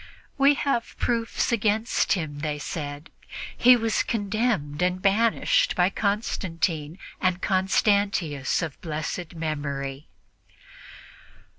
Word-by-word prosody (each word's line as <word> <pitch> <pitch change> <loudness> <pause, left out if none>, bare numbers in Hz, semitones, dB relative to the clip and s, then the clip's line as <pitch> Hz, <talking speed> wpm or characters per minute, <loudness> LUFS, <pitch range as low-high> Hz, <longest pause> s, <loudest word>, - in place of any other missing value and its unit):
"We 280 +1 +5
have 275 -5 -1
proofs 230 0 0
against 220 0 +1
him," 155 -6 -3
they 150 0 -2
said; 145 0 -6 0.4
"he 250 +1 +7
was 225 -2 +1
condemned 205 -8 -1
and 180 0 +1
banished 230 - +2
by 180 +2 +3
Constantine 175 -7 -1 0.2
and 185 -1 +1
Constantius 190 -7 +1
of 160 -4 -6
blessed 165 +2 -4
memory." 145 -3 -4
185 Hz, 100 wpm, -25 LUFS, 155-220 Hz, 0.4 s, he